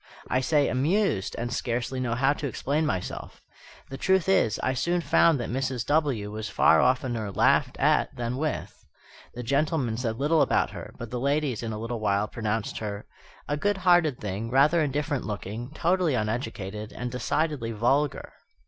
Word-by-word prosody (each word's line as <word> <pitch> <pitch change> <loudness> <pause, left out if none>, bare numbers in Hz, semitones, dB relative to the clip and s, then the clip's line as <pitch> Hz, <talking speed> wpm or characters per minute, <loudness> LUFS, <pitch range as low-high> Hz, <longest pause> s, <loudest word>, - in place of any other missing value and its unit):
I 130 - +3
say 145 +2 +2
"amused," 145 - +1
and 120 +1 -3
scarcely 125 +2 -2
know 120 -2 -1
how 135 +3 +3
to 145 - -4
explain 145 +4 -1
myself. 90 -7 -4 0.5
The 135 - -6
truth 190 +1 +2
is, 190 - +3
I 130 - +1
soon 170 +7 0
found 165 -3 +3
that 120 - -3
Mrs. 130 -2 -2
W. 140 -9 0
was 110 0 -5
far - - +5
oftener 125 -4 0
laughed - - +2
at - - +2
than 120 +1 -3
with. 155 +1 -4 0.5
The 125 - -5
gentlemen 140 -2 0
said 115 -2 -2
little 150 +4 +2
about - - +2
her; - - -8
but 120 -2 -8
the 125 - -2
ladies 140 -2 0
in 115 -1 -4
a 105 - -4
little 115 +1 -4
while 100 0 +1
pronounced 110 -1 -3
her 105 -1 -5 0.4
"a 145 - -1
good 205 +5 0
hearted 175 -7 +3
thing, 105 +2 -4
rather 145 +6 +4
indifferent 145 -1 -1
looking, 110 +3 -5
totally 175 -4 +1
uneducated, 105 -2 -3
and 125 0 -5
decidedly 130 -1 -1
vulgar." 135 +6 0
125 Hz, 170 wpm, -26 LUFS, 115-150 Hz, 0.5 s, far